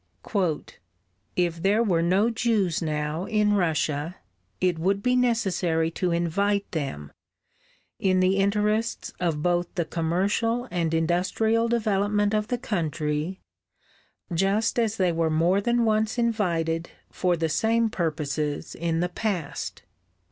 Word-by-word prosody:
"If 170 Hz, -2 st, 0 dB
there 205 Hz, +5 st, +3 dB
were 175 Hz, -7 st, +2 dB
no 190 Hz, +7 st, +3 dB
Jews 220 Hz, -7 st, +1 dB
now 155 Hz, +2 st, -2 dB
in 210 Hz, -1 st, +2 dB
Russia, 160 Hz, -3 st, 0 dB, 0.4 s
it 180 Hz, -3 st, +1 dB
would 195 Hz, +4 st, 0 dB
be 250 Hz, 0 st, +3 dB
necessary 190 Hz, -9 st, +1 dB
to 180 Hz, +2 st, -1 dB
invite 200 Hz, +4 st, +1 dB
them, 105 Hz, -, -4 dB, 0.9 s
in 185 Hz, -1 st, +2 dB
the 185 Hz, +1 st, +3 dB
interests 210 Hz, +3 st, 0 dB
of 165 Hz, -4 st, -1 dB
both 175 Hz, 0 st, +1 dB
the 170 Hz, -2 st, 0 dB
commercial 200 Hz, +10 st, 0 dB
and 170 Hz, -3 st, 0 dB
industrial 185 Hz, +8 st, +1 dB
development 205 Hz, -2 st, +1 dB
of 210 Hz, 0 st, 0 dB
the 245 Hz, -, -1 dB
country, 160 Hz, -5 st, -2 dB, 0.9 s
just 200 Hz, +7 st, +1 dB
as 225 Hz, -1 st, 0 dB
they 185 Hz, -2 st, +2 dB
were 165 Hz, -1 st, +1 dB
more 170 Hz, +5 st, +2 dB
than 240 Hz, +2 st, +2 dB
once 220 Hz, +1 st, +1 dB
invited 170 Hz, -8 st, 0 dB, 0.2 s
for 180 Hz, -2 st, +1 dB
the 165 Hz, 0 st, 0 dB
same 225 Hz, +9 st, +2 dB
purposes 155 Hz, -6 st, -2 dB
in 165 Hz, 0 st, -1 dB
the 180 Hz, -, 0 dB
past." 180 Hz, -6 st, -3 dB
185 Hz, 125 wpm, -26 LUFS, 165-215 Hz, 0.9 s, there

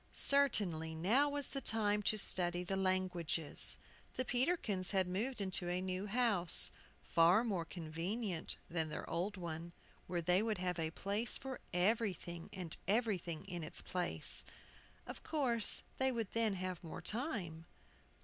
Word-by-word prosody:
CERTAINLY 190 Hz, -, +4 dB
now 230 Hz, -, +3 dB
was 285 Hz, -1 st, -3 dB
the 275 Hz, -, -3 dB
time 210 Hz, -3 st, 0 dB
to 215 Hz, +1 st, +2 dB
study 175 Hz, -3 st, +1 dB
the 195 Hz, +2 st, -2 dB
languages. 185 Hz, -5 st, 0 dB, 0.4 s
The 255 Hz, -, -1 dB
Peterkins 245 Hz, -, +1 dB
had 190 Hz, -2 st, +1 dB
moved 220 Hz, +8 st, -2 dB
into 190 Hz, -2 st, -1 dB
a 180 Hz, +1 st, 0 dB
new 185 Hz, +2 st, -3 dB
house, 210 Hz, -6 st, +4 dB, 0.3 s
far 170 Hz, +6 st, +4 dB
more 195 Hz, -8 st, -1 dB
convenient 175 Hz, +4 st, -4 dB
than 160 Hz, -2 st, -2 dB
their 150 Hz, -, -5 dB
old 195 Hz, +4 st, -2 dB
one, 170 Hz, -1 st, -6 dB, 0.3 s
where 175 Hz, -1 st, -2 dB
they 180 Hz, +3 st, +3 dB
would 220 Hz, -2 st, -1 dB
have 180 Hz, -1 st, -2 dB
a 160 Hz, -1 st, -1 dB
place 200 Hz, +7 st, -1 dB
for 265 Hz, -1 st, -6 dB
everything 180 Hz, -3 st, -1 dB
and 180 Hz, -4 st, -4 dB
everything 195 Hz, -7 st, 0 dB
in 175 Hz, -2 st, -5 dB
its 155 Hz, -, -4 dB
place. 180 Hz, -1 st, +3 dB, 0.6 s
Of -, -, -8 dB
course 245 Hz, -8 st, +3 dB, 0.2 s
they 265 Hz, 0 st, +3 dB
would 230 Hz, -5 st, -3 dB
then 225 Hz, -3 st, +1 dB
have 185 Hz, -1 st, -4 dB
more 165 Hz, -, -7 dB
time. 195 Hz, -, -2 dB
185 Hz, 150 wpm, -37 LUFS, 175-225 Hz, 0.6 s, CERTAINLY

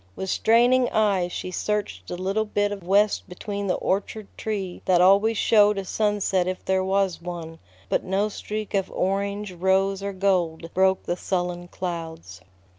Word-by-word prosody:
With 190 Hz, -, -3 dB
straining 245 Hz, +3 st, +4 dB
eyes 195 Hz, -5 st, +1 dB
she 185 Hz, -, -5 dB
searched 185 Hz, -, -3 dB
the 175 Hz, -, -5 dB
little 195 Hz, +4 st, 0 dB
bit 205 Hz, -1 st, 0 dB
of 205 Hz, -1 st, -5 dB
west 200 Hz, +3 st, +2 dB
between 200 Hz, +2 st, -5 dB
the 185 Hz, -, +1 dB
orchard 200 Hz, +2 st, -2 dB
tree 195 Hz, -5 st, -4 dB
that 180 Hz, -2 st, +4 dB
always 200 Hz, +5 st, +5 dB
showed 210 Hz, -1 st, +4 dB
a 195 Hz, -, -3 dB
sunset 205 Hz, -3 st, 0 dB
if 185 Hz, 0 st, -4 dB
there 190 Hz, 0 st, +1 dB
was 190 Hz, -2 st, 0 dB
one; 165 Hz, -2 st, -7 dB, 0.3 s
but -, -, 0 dB
no 195 Hz, +3 st, 0 dB
streak 215 Hz, 0 st, -5 dB
of 195 Hz, -2 st, 0 dB
orange, 200 Hz, +1 st, -2 dB
rose, 190 Hz, +2 st, +1 dB
or 200 Hz, 0 st, -3 dB
gold 175 Hz, -4 st, 0 dB
broke 190 Hz, 0 st, +2 dB
the 175 Hz, -, -2 dB
sullen 175 Hz, -1 st, -3 dB
clouds. 165 Hz, -, -6 dB
190 Hz, 165 wpm, -24 LUFS, 180-205 Hz, 0.3 s, always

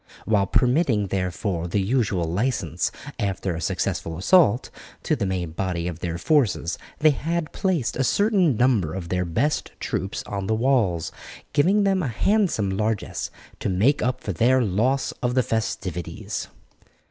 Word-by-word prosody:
While 100 Hz, -3 st, +2 dB
permitting 125 Hz, -, +2 dB
therefore 90 Hz, -1 st, -2 dB
the 95 Hz, +4 st, 0 dB
usual 100 Hz, -3 st, +1 dB
licence, 90 Hz, -, -1 dB, 0.3 s
after 95 Hz, -3 st, -1 dB
a 80 Hz, -, -5 dB
successful 80 Hz, +1 st, -2 dB
assault, 135 Hz, -, +4 dB, 0.3 s
to -, -, +1 dB
the 100 Hz, -, -1 dB
main 90 Hz, -3 st, -2 dB
body 85 Hz, 0 st, -2 dB
of 85 Hz, -2 st, -5 dB
their 85 Hz, -1 st, -3 dB
forces, 105 Hz, -, +1 dB, 0.2 s
they 155 Hz, 0 st, +5 dB
had 160 Hz, +3 st, -2 dB
placed 180 Hz, -10 st, 0 dB
a 135 Hz, -, +1 dB
certain 185 Hz, -, +3 dB
number 110 Hz, -10 st, +2 dB
of 90 Hz, -3 st, -5 dB
their 90 Hz, 0 st, 0 dB
best 140 Hz, -, -1 dB
troops 95 Hz, +2 st, -3 dB
on 100 Hz, -1 st, -4 dB
the 110 Hz, -, +1 dB
walls, 110 Hz, -, +1 dB, 0.4 s
giving 185 Hz, +9 st, +4 dB
them 195 Hz, -1 st, +2 dB
a 155 Hz, -, -1 dB
handsome 130 Hz, -, +1 dB
largess 105 Hz, +2 st, -2 dB, 0.3 s
to -, -, -2 dB
make 105 Hz, +11 st, +2 dB
up 130 Hz, +1 st, -1 dB
for 100 Hz, -, -2 dB
their 125 Hz, +8 st, +3 dB
loss 120 Hz, +7 st, +1 dB
of 125 Hz, 0 st, 0 dB
the 130 Hz, -, +4 dB
festivities. 95 Hz, -7 st, -3 dB
110 Hz, 155 wpm, -24 LUFS, 90-135 Hz, 0.4 s, they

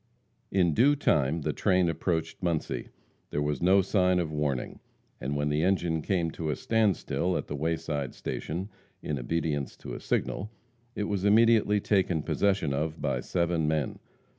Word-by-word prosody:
In 90 Hz, -4 st, +2 dB
due 140 Hz, -, +5 dB
time 75 Hz, -, +1 dB
the -, -, -1 dB
train 90 Hz, -1 st, +2 dB
approached 85 Hz, 0 st, -2 dB
Muncie. 85 Hz, -4 st, -2 dB, 0.4 s
There 75 Hz, -, -2 dB
was 75 Hz, -1 st, -1 dB
no 95 Hz, +2 st, +5 dB
sign 90 Hz, -1 st, +2 dB
of 85 Hz, -3 st, -1 dB
warning, 75 Hz, -4 st, -2 dB, 0.4 s
and 70 Hz, +3 st, -3 dB
when 75 Hz, +1 st, 0 dB
the 75 Hz, +1 st, +1 dB
engine 85 Hz, -3 st, +1 dB
came 85 Hz, -2 st, 0 dB
to 80 Hz, -1 st, -4 dB
a 75 Hz, -, 0 dB
standstill 100 Hz, -, +1 dB
at -, -, -3 dB
the 75 Hz, -, -5 dB
wayside 80 Hz, -3 st, -2 dB
station, 90 Hz, +6 st, -4 dB, 0.3 s
in 75 Hz, -3 st, -2 dB
obedience 75 Hz, 0 st, -2 dB
to -, -, -8 dB
a -, -, -5 dB
signal, 105 Hz, -, -2 dB, 0.5 s
it 105 Hz, -, -1 dB
was 100 Hz, -2 st, -2 dB
immediately 110 Hz, 0 st, +5 dB
taken 95 Hz, -6 st, +1 dB
possession 95 Hz, -8 st, +1 dB
of 75 Hz, +3 st, -2 dB
by -, -, -1 dB
seven 85 Hz, -3 st, 0 dB
men. 75 Hz, -3 st, -1 dB
85 Hz, 165 wpm, -28 LUFS, 75-95 Hz, 0.5 s, due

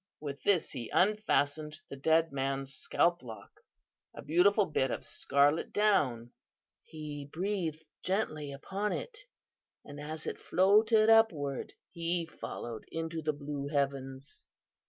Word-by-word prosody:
With 145 Hz, -1 st, -6 dB
this 195 Hz, -5 st, +3 dB
he 120 Hz, -5 st, -6 dB
unfastened 155 Hz, -7 st, +1 dB
from 155 Hz, -, -17 dB
the -, -, -4 dB
dead 160 Hz, +4 st, +2 dB
man's 135 Hz, 0 st, -2 dB
scalp 170 Hz, +2 st, +1 dB
lock 115 Hz, -3 st, -10 dB, 0.6 s
a -, -, -8 dB
beautiful 195 Hz, +7 st, +4 dB
bit 135 Hz, -5 st, 0 dB
of -, -, -3 dB
scarlet 145 Hz, +3 st, +1 dB
down. 130 Hz, -, +2 dB, 0.5 s
He 150 Hz, -2 st, -8 dB
breathed 170 Hz, -4 st, -2 dB, 0.2 s
gently 155 Hz, -7 st, -1 dB
upon 195 Hz, +9 st, -3 dB
it, 470 Hz, 0 st, -5 dB, 0.7 s
and 145 Hz, 0 st, -9 dB
as 155 Hz, +2 st, -5 dB
it -, -, -4 dB
floated 215 Hz, +4 st, +4 dB
upward 155 Hz, -, +2 dB, 0.2 s
he 170 Hz, 0 st, -1 dB
followed 120 Hz, -7 st, -7 dB
into 165 Hz, 0 st, -3 dB
the 155 Hz, 0 st, 0 dB
blue 145 Hz, -1 st, -5 dB
heavens. 140 Hz, -1 st, -3 dB
155 Hz, 130 wpm, -31 LUFS, 140-185 Hz, 0.7 s, beautiful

